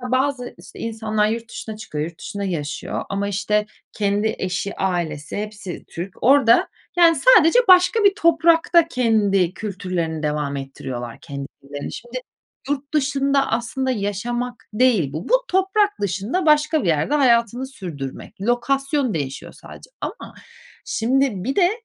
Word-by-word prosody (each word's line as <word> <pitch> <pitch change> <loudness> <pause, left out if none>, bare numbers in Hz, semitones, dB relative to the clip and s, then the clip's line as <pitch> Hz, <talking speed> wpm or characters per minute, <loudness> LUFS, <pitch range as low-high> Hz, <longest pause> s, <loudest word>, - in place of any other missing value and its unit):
bazı, 255 0 -1
işte, - - -13
insanlar 220 -2 -1
yurt 230 +1 -3
dışına 220 -1 -7
çıkıyor, 155 -8 -4
yurt 165 0 -8
dışında 200 0 -5
yaşıyor 150 -6 -3
ama 200 0 -2
işte, 210 +1 0 0.3
kendi 205 +1 0
eşi, 190 +2 -3
ailesi, 170 -6 -2
hepsi 210 -3 -6
Türk, 175 +3 -8
orada, 255 -3 +5 0.3
yani, 335 -2 +6
sadece 275 - +6
başka 370 +4 +6
bir 400 - +6
toprakta 335 -1 +4
kendi 205 - +2
kültürlerini 180 -6 -3
devam 150 -2 -1
ettiriyorlar, 130 -3 -6
kendilerini. 140 0 -8
Şimdi, 240 +2 -8 0.5
yurt 285 +1 -3
dışında 275 -1 +2
aslında 240 +3 -1
yaşamak 240 +2 -3
değil 210 - +2
bu. 155 - -5
Bu - - +3
toprak 390 +2 +1
dışında, 205 - -1
başka 305 0 +3
bir - - -2
yerde 160 - +1
hayatını 245 -2 +3
sürdürmek. 175 - -8
Lokasyon 270 +3 0
değişiyor 140 -3 -4
sadece - - -13
ama - - -6 0.5
şimdi 245 -4 0
bir 265 +4 -2
de 360 -2 +4
225 Hz, 135 wpm, -21 LUFS, 185-275 Hz, 0.5 s, yani